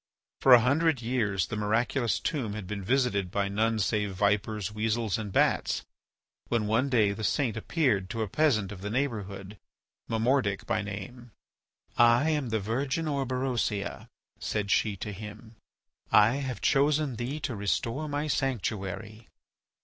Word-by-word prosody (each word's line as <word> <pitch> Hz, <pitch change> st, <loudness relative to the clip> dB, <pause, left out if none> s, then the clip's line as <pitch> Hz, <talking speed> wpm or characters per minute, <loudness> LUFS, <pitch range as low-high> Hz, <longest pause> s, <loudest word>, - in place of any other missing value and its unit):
For 130 Hz, -, +7 dB
a -, -, +7 dB
hundred 140 Hz, +1 st, +2 dB
years 110 Hz, -6 st, 0 dB
the -, -, -5 dB
miraculous 115 Hz, +4 st, 0 dB
tomb 130 Hz, -, -2 dB
had 105 Hz, -2 st, -6 dB
been 100 Hz, +1 st, -5 dB
visited 120 Hz, -5 st, +1 dB
by 100 Hz, +2 st, 0 dB
none 110 Hz, +3 st, +1 dB
save 105 Hz, -1 st, 0 dB
vipers, 105 Hz, +1 st, 0 dB
weasels, 110 Hz, 0 st, -1 dB
and 105 Hz, -3 st, -5 dB
bats, -, -, +1 dB, 0.6 s
when, 115 Hz, -3 st, 0 dB
one 115 Hz, +6 st, +1 dB
day 110 Hz, -6 st, +3 dB
the 110 Hz, +2 st, -5 dB
saint 120 Hz, 0 st, +1 dB
appeared 110 Hz, -, 0 dB
to 115 Hz, -1 st, -2 dB
a -, -, -3 dB
peasant 110 Hz, -5 st, +1 dB
of 95 Hz, -3 st, -8 dB
the 105 Hz, -, -4 dB
neighbourhood, 105 Hz, -5 st, -3 dB, 0.5 s
Momordic 115 Hz, -3 st, +1 dB
by 110 Hz, +2 st, 0 dB
name. 105 Hz, +5 st, -7 dB, 0.7 s
"I 120 Hz, +6 st, +5 dB
am 145 Hz, -5 st, -1 dB
the 110 Hz, 0 st, 0 dB
virgin 130 Hz, +9 st, -1 dB
Orberosia," 130 Hz, -7 st, -2 dB, 0.3 s
said 100 Hz, -2 st, -2 dB
she 105 Hz, -2 st, +2 dB
to 105 Hz, -, -5 dB
him; 105 Hz, +2 st, -10 dB, 0.6 s
"I 115 Hz, +5 st, +5 dB
have 130 Hz, -7 st, -4 dB
chosen 145 Hz, -2 st, +2 dB
thee 130 Hz, +6 st, -3 dB
to 130 Hz, -5 st, -3 dB
restore 115 Hz, -, -1 dB
my 145 Hz, +1 st, -1 dB
sanctuary. 110 Hz, -6 st, -3 dB
110 Hz, 150 wpm, -28 LUFS, 105-130 Hz, 0.7 s, For